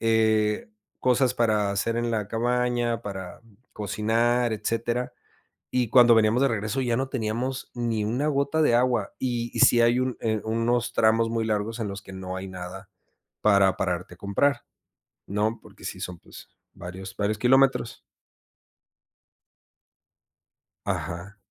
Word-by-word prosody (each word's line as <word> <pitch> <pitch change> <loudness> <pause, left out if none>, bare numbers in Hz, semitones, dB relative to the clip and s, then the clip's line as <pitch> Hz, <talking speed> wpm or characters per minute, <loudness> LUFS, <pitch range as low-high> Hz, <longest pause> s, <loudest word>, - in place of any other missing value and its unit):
eh, 110 - +2 0.3
cosas 125 0 +2
para 110 -4 +2
hacer 115 +4 -1
en 120 0 -1
la 105 -3 -2
cabaña, 120 0 0
para 95 -2 -7 0.3
cocinar, 115 +3 +1
etcétera. 115 +3 -2 0.6
Y 125 -2 +1
cuando 120 0 +7
veníamos 110 +3 +3
de 140 - +4
regreso 110 +3 -2
ya 120 -3 0
no 135 +2 -1
teníamos 125 +2 -3
ni 115 -3 -1
una 125 +7 -1
gota 140 +1 +1
de 150 -6 +4
agua. 120 -4 +1
Y 120 -2 -2
y - - -1
sí 120 - +6
hay 120 +2 +4
un, 130 -1 -1
eh, 110 -2 0
unos 115 +2 0
tramos 115 +1 +3
muy 115 -1 -1
largos 110 +1 -2
en 115 - -2
los 100 +1 -6
que 95 - -12
no 95 -1 -6
hay 95 +1 -6
nada 95 +1 -8 0.5
para 100 -3 +4
pararte 90 -1 -2
a - - -16
comprar 120 +8 +1 0.7
¿no? 105 +3 -1
porque - - -16
sí - - -5
son, 90 -1 -6
pues, - - -14 0.3
varios 95 +2 -8
varios 105 +1 -1
kilómetros. 130 0 +3 2.9
Ajá. 90 +4 -4
115 Hz, 145 wpm, -26 LUFS, 105-120 Hz, 2.9 s, cuando